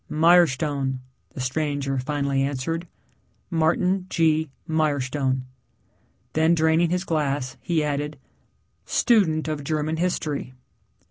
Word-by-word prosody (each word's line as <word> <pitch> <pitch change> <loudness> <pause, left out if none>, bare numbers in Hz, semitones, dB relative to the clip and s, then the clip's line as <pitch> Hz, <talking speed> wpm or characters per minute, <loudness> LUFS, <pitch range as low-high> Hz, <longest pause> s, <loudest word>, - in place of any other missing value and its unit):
"Mirestone," 150 -5 +3 0.4
the - - -7
stranger 140 0 -1
finally 140 0 -1
answered, 145 +5 -2 0.6
"Martin 180 +3 +1
G. 160 -3 +2 0.2
Mirestone." 140 -4 0 0.9
Then, 160 +2 +3
draining 160 +1 +3
his 180 +1 0
glass, 140 -6 -1
he 165 -3 0
added, 150 0 -2 0.7
"Student 175 -11 +2
of 155 -2 -3
German 155 +2 -1
history." 155 -6 -2
155 Hz, 95 wpm, -24 LUFS, 140-165 Hz, 0.9 s, Mirestone